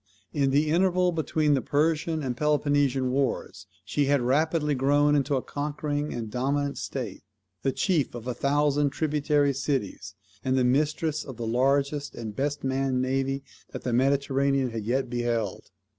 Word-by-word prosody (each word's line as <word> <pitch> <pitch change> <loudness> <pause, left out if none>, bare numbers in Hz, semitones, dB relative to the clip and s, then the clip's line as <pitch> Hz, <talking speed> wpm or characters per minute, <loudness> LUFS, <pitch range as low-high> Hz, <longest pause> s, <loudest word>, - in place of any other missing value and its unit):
In 140 -3 +2
the 150 +3 +2
interval 180 +1 +3
between 155 -2 +1
the 135 - +2
Persian 155 +2 0
and 125 -2 -2
Peloponnesian 145 -2 +1
wars 130 -6 -2 0.2
she 145 - 0
had 140 +1 +3
rapidly 150 +4 +1
grown 145 +2 +3
into 140 0 +1
a 130 - -1
conquering 145 0 -3
and 115 -3 -5
dominant 140 +4 -1
state, 120 -8 -5 0.4
the 135 - +1
chief 155 -4 0
of 120 -1 -7
a 125 - -2
thousand 145 +2 +2
tributary 145 -1 +1
cities, 130 -7 -3 0.3
and 130 0 +1
the 130 - +3
mistress 150 +4 +1
of 130 -5 -9
the 120 - -4
largest 140 +4 +1
and 110 -3 -6
best 145 +3 -2
manned 135 -1 0
navy 135 +1 -1 0.3
that - - -6
the 125 - -1
Mediterranean 135 0 +2
had 110 -2 -5
yet 130 +4 0
beheld. 120 -4 -2
140 Hz, 160 wpm, -27 LUFS, 130-145 Hz, 0.4 s, interval